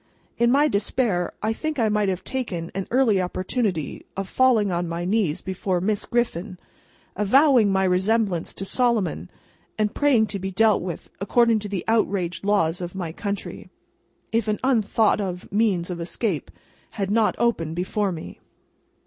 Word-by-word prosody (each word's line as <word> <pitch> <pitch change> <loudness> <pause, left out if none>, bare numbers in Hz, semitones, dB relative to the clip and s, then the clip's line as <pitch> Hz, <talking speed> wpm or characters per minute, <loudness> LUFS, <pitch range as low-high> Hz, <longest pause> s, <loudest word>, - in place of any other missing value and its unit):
In 235 0 +4
my 285 +4 +4
despair, 200 - 0
I 220 +1 +1
think 310 +5 -4
I 230 -3 +2
might 210 -1 +1
have 185 -1 -3
taken 185 -11 -4
an 195 0 -4
early 235 -6 +3
opportunity 185 - -2
of 195 -1 -3
falling 230 -4 +3
on 175 0 -1
my 170 +1 -3
knees 185 -4 0
before 190 -1 -1
Miss 205 +3 -1
Griffin, 220 -6 -1 0.6
avowing 235 +1 +4
my 190 0 +2
resemblance 190 -1 +1
to 195 - -5
Solomon, 235 -3 0 0.5
and 210 -1 0
praying 270 -7 +3
to 200 - -3
be 190 +1 -3
dealt 215 +1 +3
with 175 -2 -6
according 230 +3 +3
to 205 0 -6
the 195 -3 -3
outraged 200 -6 0
laws 185 -4 +1
of 175 +1 -6
my 175 -4 -4
country, 200 +4 -5 0.6
if 225 -1 0
an 210 0 0
unthought 225 -4 +2
of 180 -2 -4
means 195 -5 +1
of 170 -1 -5
escape 175 - -2 0.5
had 195 -1 -1
not 220 0 +2
opened 165 -9 0
before 190 +3 -1
me. 160 -2 -8
200 Hz, 160 wpm, -24 LUFS, 180-225 Hz, 0.6 s, In